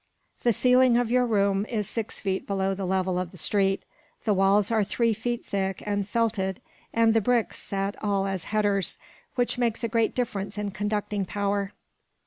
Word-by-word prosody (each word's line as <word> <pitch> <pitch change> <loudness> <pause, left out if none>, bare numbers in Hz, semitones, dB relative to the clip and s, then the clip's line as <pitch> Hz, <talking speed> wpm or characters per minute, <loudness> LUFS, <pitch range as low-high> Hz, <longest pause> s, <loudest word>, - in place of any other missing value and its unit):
The 240 - +3
ceiling 250 +1 +4
of 240 -1 +1
your 250 0 +3
room 200 -2 +2
is 210 -4 -1
six 225 -2 -4
feet 190 -1 -2
below 195 -1 0
the 190 -1 -3
level 185 -1 +1
of 180 -2 -3
the 185 - -14
street, 195 +3 +1 0.4
the 215 - +2
walls 195 +2 +3
are 220 -2 +3
three 230 +3 +1
feet 240 +2 -3
thick 195 -1 -2
and 205 -1 -1
felted, 210 -5 0 0.3
and 230 -1 +4
the 225 - +3
bricks 240 +1 +1
set 195 +1 -2
all 200 -2 +1
as 190 -3 -3
headers, 205 -2 +1 0.4
which 245 0 0
makes 235 -1 0
a - - +2
great 225 0 +1
difference 210 -5 -2
in 205 -1 -2
conducting 205 0 -1
power. 200 +1 -1
205 Hz, 180 wpm, -26 LUFS, 195-230 Hz, 0.4 s, ceiling